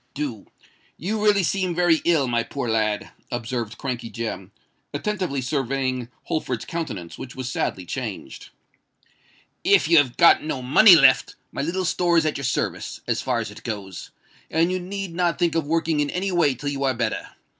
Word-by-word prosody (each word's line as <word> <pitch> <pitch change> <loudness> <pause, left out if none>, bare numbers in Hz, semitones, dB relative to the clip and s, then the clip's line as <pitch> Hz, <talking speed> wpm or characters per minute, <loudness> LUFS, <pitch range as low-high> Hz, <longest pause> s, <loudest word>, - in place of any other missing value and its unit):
"Do. 135 -8 -4 0.5
You 210 +6 -2
really 205 -2 +4
seem 185 -1 0
very 175 -2 +3
ill, 160 -6 +3
my 120 -1 +1
poor 130 +1 -4
lad," 110 -2 0 0.2
observed 120 -2 -3
Crankey 120 -3 -4
Jem, 110 -4 -5 0.4
attentively 185 -10 -2
surveying 130 -2 -1
Holford's 125 -7 -3
countenance, 140 - -5
which 125 - -8
was 130 -1 -4
sadly 95 -6 -2
changed. - - -6 1.1
"If - - +4
you 165 -1 +7
have 130 -4 0
got 170 - +6
no 140 -4 -4
money 175 +10 +8
left, 135 -4 +5 0.2
my - - -3
little 180 +5 -1
store 175 0 +2
is 160 - +3
at 155 - 0
your 140 - -4
service, 125 - -2
as - - -1
far - - 0
as - - -6
it - - -12
goes; 100 -5 -6 0.4
and 165 +2 +2
you 185 - -1
need 190 0 -5
not 175 0 0
think 175 -2 +1
of 165 -3 -1
working 165 -1 +1
in 145 -1 +1
any 190 +4 -2
way 160 -7 +2
till 145 +4 -4
you 140 -1 -3
are 130 -1 +1
better. 115 -2 -3
145 Hz, 180 wpm, -23 LUFS, 125-170 Hz, 1.1 s, money